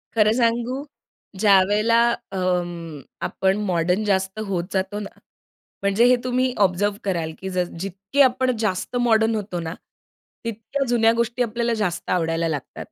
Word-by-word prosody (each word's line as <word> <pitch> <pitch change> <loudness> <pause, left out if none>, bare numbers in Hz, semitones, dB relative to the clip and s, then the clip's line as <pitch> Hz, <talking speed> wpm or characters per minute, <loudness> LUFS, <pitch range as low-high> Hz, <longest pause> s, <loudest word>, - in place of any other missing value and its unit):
खरं 215 -1 +4
सांगू 240 +3 0 0.6
ज्यावेळेला 210 +3 +4 0.3
अंम, 175 -4 -2 0.3
आपण 190 +1 0
मॉडर्न 180 +3 +1
जास्त 190 +1 0
होत 180 -3 -1
जातो 195 +2 -1
ना, 200 - -6 0.7
म्हणजे 200 +4 +3
हे 250 0 +6
तुम्ही 255 0 0
ऑब्झर्व्ह 200 +3 0
कराल 170 -5 -1
की 190 - -5
जस 180 -1 -1
जितके 195 +9 -1
आपण 255 -1 +3
जास्त 210 +2 -2
मॉडर्न 225 -1 +3
होतो 195 -4 -3
ना 165 0 -4 0.7
तितक्या 225 +5 -3
जुन्या 225 -2 +4
गोष्टी 235 +2 0
आपल्याला 235 +1 -1
जास्त 180 -3 -3
आवडायला 165 -1 +1
लागतात. 150 -4 -5
205 Hz, 140 wpm, -23 LUFS, 180-230 Hz, 0.7 s, हे